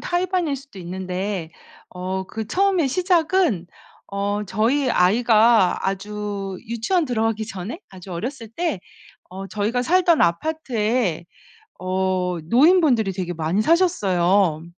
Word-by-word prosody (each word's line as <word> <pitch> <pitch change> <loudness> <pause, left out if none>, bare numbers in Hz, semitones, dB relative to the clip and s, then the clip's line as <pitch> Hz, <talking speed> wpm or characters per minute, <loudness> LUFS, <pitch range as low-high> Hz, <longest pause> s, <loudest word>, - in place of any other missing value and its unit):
타의 355 +1 -1
반일 355 -5 0
수도 275 -7 -11
있는데 185 0 -4 0.4
어 185 +1 -4
그 220 -1 -5
처음에 375 - +2
시작은 340 - +1 0.4
어 205 +1 -2
저희 240 +8 +1
아이가 220 0 +4
아주 200 0 -4
유치원 270 - 0
들어가기 225 -3 -1
전에 200 - -6
아주 185 -1 -11
어렸을 230 +6 -5
때 270 - -3 0.5
어 190 +1 -7
저희가 215 +5 -1
살던 345 +3 +3
아파트에 220 - 0 0.6
어 185 -1 -1
노인분들이 260 - +4
되게 180 -2 -4
많이 165 +5 0
사셨어요. 195 - +2
215 Hz, 260 characters per minute, -22 LUFS, 185-280 Hz, 0.6 s, 아이가